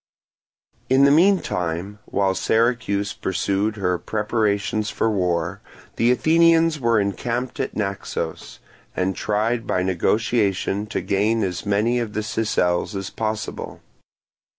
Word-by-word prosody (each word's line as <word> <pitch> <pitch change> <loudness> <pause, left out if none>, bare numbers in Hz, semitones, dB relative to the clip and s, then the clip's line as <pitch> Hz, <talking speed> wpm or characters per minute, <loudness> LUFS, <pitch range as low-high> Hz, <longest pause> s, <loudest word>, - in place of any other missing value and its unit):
In 130 +1 +5
the 140 - +5
meantime, 105 - +1
while 95 -1 0
Syracuse 110 -2 0
pursued 100 +3 -1
her 90 -4 -1
preparations 105 0 -1
for 115 - 0
war, 90 -1 -1 0.4
the 115 - +3
Athenians 165 +3 +4
were 115 -3 +2
encamped 115 +5 -2
at - - -3
Naxos, 100 -3 -4 0.4
and 95 0 0
tried 110 +4 -1
by 90 - 0
negotiation 100 +2 0
to - - -3
gain 105 +3 +1
as 90 0 -3
many 110 +4 +2
of 115 -3 -4
the 110 - -2
Sicels 105 -3 0
as 95 -1 -4
possible. 110 -1 -4
105 Hz, 120 wpm, -22 LUFS, 95-115 Hz, 0.4 s, In